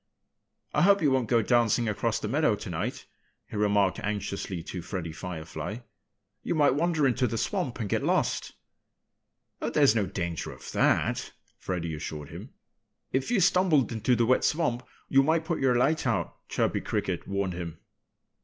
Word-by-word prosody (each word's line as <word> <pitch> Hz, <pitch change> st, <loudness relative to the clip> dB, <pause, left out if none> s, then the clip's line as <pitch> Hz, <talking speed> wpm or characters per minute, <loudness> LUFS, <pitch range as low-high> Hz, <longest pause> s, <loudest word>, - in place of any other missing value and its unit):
"I -, -, +2 dB
hope 200 Hz, 0 st, +5 dB
you 145 Hz, -, +4 dB
won't 130 Hz, -4 st, +1 dB
go 115 Hz, -2 st, +3 dB
dancing 120 Hz, 0 st, +3 dB
across 115 Hz, +2 st, 0 dB
the 110 Hz, -, -4 dB
meadow 145 Hz, 0 st, +2 dB
tonight," 90 Hz, -6 st, -4 dB, 0.4 s
he -, -, -10 dB
remarked 105 Hz, -2 st, +2 dB
anxiously 100 Hz, -4 st, -3 dB
to 90 Hz, +1 st, -6 dB
Freddie 85 Hz, -2 st, -5 dB
Firefly. 85 Hz, +4 st, -6 dB, 0.6 s
"You -, -, -2 dB
might 145 Hz, -4 st, +4 dB
wander 160 Hz, 0 st, +1 dB
into 130 Hz, -1 st, +2 dB
the 115 Hz, 0 st, -3 dB
swamp 145 Hz, -, -2 dB
and 110 Hz, -, -2 dB
get -, -, 0 dB
lost." -, -, 0 dB, 1.1 s
"Oh, -, -, -1 dB
there's 140 Hz, -6 st, +4 dB
no 105 Hz, -4 st, +1 dB
danger 85 Hz, -3 st, -3 dB
of -, -, -10 dB
that!" -, -, +1 dB, 0.3 s
Freddie 85 Hz, -3 st, -3 dB
assured 75 Hz, -1 st, -6 dB
him. -, -, -9 dB, 0.6 s
"If 130 Hz, 0 st, 0 dB
you 240 Hz, -4 st, +2 dB
stumbled 175 Hz, -7 st, +3 dB
into 115 Hz, +2 st, +1 dB
the 115 Hz, -, +2 dB
wet 130 Hz, +2 st, +3 dB
swamp 150 Hz, -7 st, +1 dB, 0.3 s
you 135 Hz, -, +5 dB
might 160 Hz, +3 st, +1 dB
put 170 Hz, -1 st, -1 dB
your 130 Hz, -2 st, +3 dB
light 140 Hz, +3 st, +2 dB
out," 100 Hz, -8 st, -2 dB
Chirpy -, -, 0 dB
Cricket -, -, -2 dB
warned 100 Hz, -1 st, -1 dB
him. 85 Hz, -2 st, -6 dB
115 Hz, 165 wpm, -28 LUFS, 95-140 Hz, 1.1 s, hope